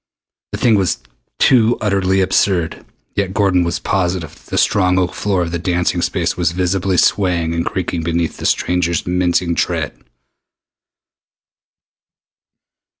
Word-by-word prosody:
The - - -2
thing 115 - +3
was 95 -3 0 0.4
too 120 -3 +4
utterly 95 -2 +1
absurd 90 -3 +1 0.3
yet 100 -1 -1
Gordon 95 -4 +3
was 85 0 -1
positive 90 -4 -2
that - - -20
the - - -2
strong 90 -3 +2
oak 90 -1 0
floor 95 -3 0
of 85 - -4
the 85 - -2
dancing 90 0 0
space 85 -1 -1
was 85 -2 0
visibly 90 +1 0
swaying 85 -5 +2
and 85 0 -1
creaking 90 -2 -3
beneath 85 0 -2
the - - -2
stranger's 85 -2 0
mincing 90 -1 +1
tread! - - -2
90 Hz, 135 wpm, -17 LUFS, 85-95 Hz, 0.4 s, too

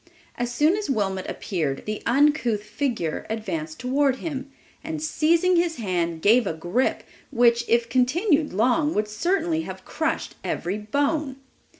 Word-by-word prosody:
As 240 0 -2
soon 300 +8 +3
as 415 -6 -4
Wilmot 195 -6 -1
appeared, 155 -9 -3
the 215 0 -4
uncouth 245 -5 +2
figure 215 - -3
advanced 175 -8 -4
toward 265 +2 +2
him, 275 -1 -5 0.3
and 315 0 -4
seizing 330 +3 +2
his 340 -1 +1
hand, 175 -7 -2
gave 230 +1 +5
a - - -1
grip, 175 +11 -1 0.3
which, 235 -2 +3
if 235 0 +3
continued 295 - +2
long, 250 - +2
would 210 0 +1
certainly 325 - 0
have - - -8
crushed - - -2
every 190 +4 -2
bone! 280 +5 -1
245 Hz, 140 wpm, -24 LUFS, 210-300 Hz, 0.3 s, gave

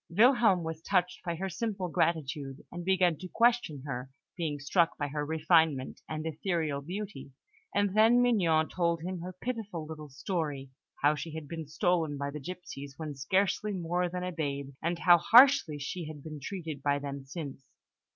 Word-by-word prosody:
Wilhelm 220 -2 +5
was 160 0 -5
touched 180 0 0
by 170 -1 -2
her 190 +4 -3
simple 195 0 -3
gratitude, 150 -4 -1
and 175 0 -6
began 180 -3 +2
to 185 - -6
question 230 - +2
her, 125 -2 -4 0.3
being 155 -5 -2
struck 165 +4 +2
by 145 -1 -2
her 150 +1 -2
refinement 155 -3 +2
and 155 0 -4
ethereal 160 -2 -1
beauty; 180 -4 -6 0.4
and 205 -1 +2
then 225 +3 +6
Mignon 175 -11 +3
told 170 -2 0
him 185 0 -4
her 180 +2 -6
pitiful 205 -4 -5
little 155 -1 -8
story, 145 -2 -3 0.3
how 145 +1 +6
she 155 +1 -6
had 160 -2 -6
been 160 -1 -6
stolen 165 -2 0
by 140 0 -3
the 150 - -6
gipsies 145 -4 -8
when 155 -2 -5
scarcely 195 +8 0
more 175 0 -1
than 180 +1 -4
a 180 - -2
babe, 140 -4 -3
and 170 +1 -1
how 175 0 +6
harshly 235 - +6
she 155 +4 -5
had 150 -2 -9
been 155 -1 -7
treated 160 -3 -5
by 145 0 +2
them 140 -1 -5
since. 140 -1 -7
165 Hz, 175 wpm, -30 LUFS, 145-185 Hz, 0.4 s, then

